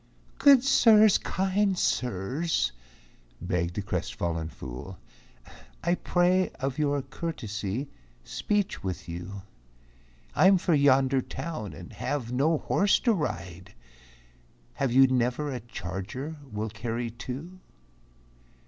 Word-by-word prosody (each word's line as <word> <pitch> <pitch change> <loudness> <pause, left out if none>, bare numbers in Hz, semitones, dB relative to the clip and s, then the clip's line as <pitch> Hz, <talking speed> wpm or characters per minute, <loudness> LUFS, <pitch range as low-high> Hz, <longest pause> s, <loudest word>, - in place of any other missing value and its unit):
"Good 275 -3 +7
Sirs, 220 -6 +6
Kind 190 0 0
Sirs," 125 - 0 0.7
begged 90 -1 -2
the 105 - -2
crestfallen 85 -4 -3
fool, 65 +8 -8 0.9
"I 170 +1 +2
pray 180 +1 +2
of 135 +2 -2
your 145 -2 +1
courtesy 125 - -4 0.4
speech 205 - -1
with 95 -2 -4
you, 90 +3 -7 0.9
I'm 190 +1 +6
for 175 -1 +1
yonder 135 -2 +4
town, 155 - -6
and 90 - -10
have 125 -5 -3
no 150 +6 +2
horse 200 +6 +2
to 235 - +3
ride, 95 - -4 1.0
Have 135 - -1
you 135 +2 +7
never 130 +3 0
a 125 - -3
charger 115 - -6 0.2
will 105 +1 -3
carry 115 +2 -3
two?" 130 +10 -7
130 Hz, 110 wpm, -27 LUFS, 100-170 Hz, 1.0 s, Good